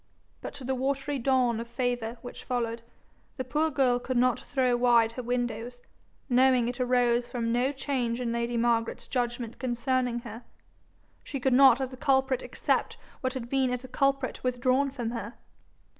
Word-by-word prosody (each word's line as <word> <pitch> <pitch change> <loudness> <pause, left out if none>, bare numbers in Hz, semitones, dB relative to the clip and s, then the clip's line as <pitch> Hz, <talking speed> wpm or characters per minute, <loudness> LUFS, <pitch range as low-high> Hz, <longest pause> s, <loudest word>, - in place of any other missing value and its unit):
But - - -7
to 280 - -8
the 265 +1 -1
watery 275 +2 -1
dawn 250 -2 +2
of 230 - -5
favour 240 -1 -2
which 245 - -9
followed, 235 -2 -2 0.6
the 260 - -2
poor 305 +5 0
girl 255 -5 +2
could 255 0 -2
not 250 0 +3
throw 255 -2 0
wide 240 -2 +4
her 250 - -6
windows, 245 0 -3 0.4
knowing 255 -1 +4
it 245 +1 -4
arose 245 -1 +2
from 230 -2 -2
no 245 +3 +2
change 260 -4 -2
in 240 -2 -2
lady 235 0 -1
Margaret's 230 -1 0
judgment 240 -2 -3
concerning 245 -1 -1
her: 230 0 -9 0.8
she 275 - -5
could 260 0 +1
not 265 -1 +7
as 265 -1 -3
a - - -9
culprit 265 -2 +2
accept - - -1 0.2
what 260 0 -2
had 245 -2 -4
been 265 0 +1
as 250 0 -3
a - - -8
culprit 275 0 0
withdrawn 255 +2 +1
from 245 -4 -4
her. 230 -1 -6
250 Hz, 175 wpm, -28 LUFS, 240-260 Hz, 0.8 s, not